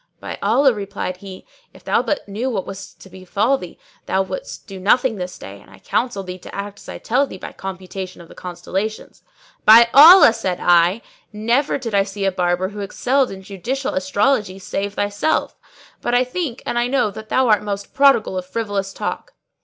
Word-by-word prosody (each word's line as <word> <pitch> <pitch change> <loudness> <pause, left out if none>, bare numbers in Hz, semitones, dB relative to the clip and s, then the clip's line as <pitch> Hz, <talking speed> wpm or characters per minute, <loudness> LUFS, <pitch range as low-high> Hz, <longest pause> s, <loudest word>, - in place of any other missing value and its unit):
"By - - -7
Allah," 250 +6 +3
replied 200 -3 -5
he, 190 0 -11 0.3
"if - - -16
thou - - +2
but 295 - -3
knew 220 +6 -3
what 200 -7 -3
is 195 0 -10
about - - -17
to 190 - -14
befall 200 +8 0
thee, 180 - -10 0.3
thou 190 - +1
wouldst - - -7
do 195 -3 -9
nothing 225 +4 +2
this 180 -1 -6
day, 100 +1 -11
and - - -20
I - - -16
counsel 240 -6 -2
thee 185 0 -8
to - - -11
act 200 +1 -6
as - - -13
I - - -6
tell 265 +5 +1
thee 190 - -9
by - - -8
computation 190 -1 -7
of 170 - -13
the - - -14
constellations." 185 +4 -5 0.4
"By 230 +2 +8
Allah," 310 -2 +9
said 190 -6 -3
I, 175 +5 +3 0.3
"never 235 +7 0
did 235 -5 -6
I 200 - +4
see 195 0 -4
a 195 - +2
barber 180 0 0
who 210 0 -9
excelled 250 +7 0
in 190 0 -9
judicial 235 +8 -4
astrology 200 +2 0
save 200 +1 -4
thyself: 205 +8 -1 0.5
but 240 - 0
I 250 - +4
think 255 -1 -4
and 240 - -1
I 240 - +1
know 250 -5 +1
that 220 +2 -10
thou 260 -1 +2
art 215 - +4
most 200 -1 -5
prodigal 270 -9 +3
of 180 - -8
frivolous 200 -2 -3
talk. - - -5
205 Hz, 200 wpm, -20 LUFS, 190-245 Hz, 0.5 s, Allah